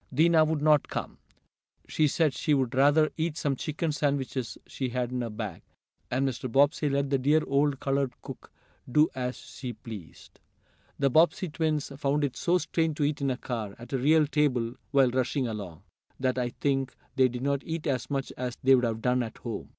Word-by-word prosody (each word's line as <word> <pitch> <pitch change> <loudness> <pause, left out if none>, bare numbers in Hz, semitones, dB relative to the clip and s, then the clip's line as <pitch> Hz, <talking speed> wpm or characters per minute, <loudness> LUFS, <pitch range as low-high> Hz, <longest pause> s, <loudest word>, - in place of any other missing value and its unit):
Dinah 160 +3 +5
would 155 -1 -1
not 150 -2 +4
come. - - -5 0.7
She 155 - +2
said 155 -1 +2
she 150 -3 +1
would 130 -2 0
rather 145 +4 +4
eat 160 -1 -1
some 140 -2 0
chicken 155 +4 -2
sandwiches 140 -4 -2
she 130 -2 -4
had 125 0 -2
in 125 -1 -2
her 120 - -3
bag, 105 -5 -6 0.5
and 135 +2 +1
Mr. 130 -1 -4
Bobbsey 145 +3 +3
let 140 0 0
the 135 - +2
dear 150 +4 +3
old 140 0 +1
colored 135 -2 0
cook - - -10 0.4
do 150 +4 +5
as 125 -1 -3
she 125 -3 -7
pleased. 105 -10 -11 0.6
The 140 -1 +2
Bobbsey 170 +4 +3
twins 155 -2 -1
found 145 +1 +1
it 140 -3 -1
so 180 +1 +2
strange 160 -3 -1
to 150 - 0
eat 145 0 0
in 140 - +1
a 125 - -1
car, 110 -6 -5
at 120 +3 -11
a 135 - +1
real 155 +4 +4
table, 130 -6 +1 0.2
while 135 -3 +4
rushing 130 +1 0
along, 100 -6 -6 0.4
that 130 -1 0
I 120 -1 0
think 135 0 -1 0.2
they 130 -1 +5
did 125 0 -5
not 140 0 0
eat 165 -1 -4
as 125 -5 -1
much 135 -2 -2
as 125 -1 -4
they 135 +1 +6
would 125 -2 +4
have 115 -1 -3
done 125 0 +2
at 115 -2 -5
home. 115 -2 -6
135 Hz, 200 wpm, -28 LUFS, 125-150 Hz, 0.7 s, they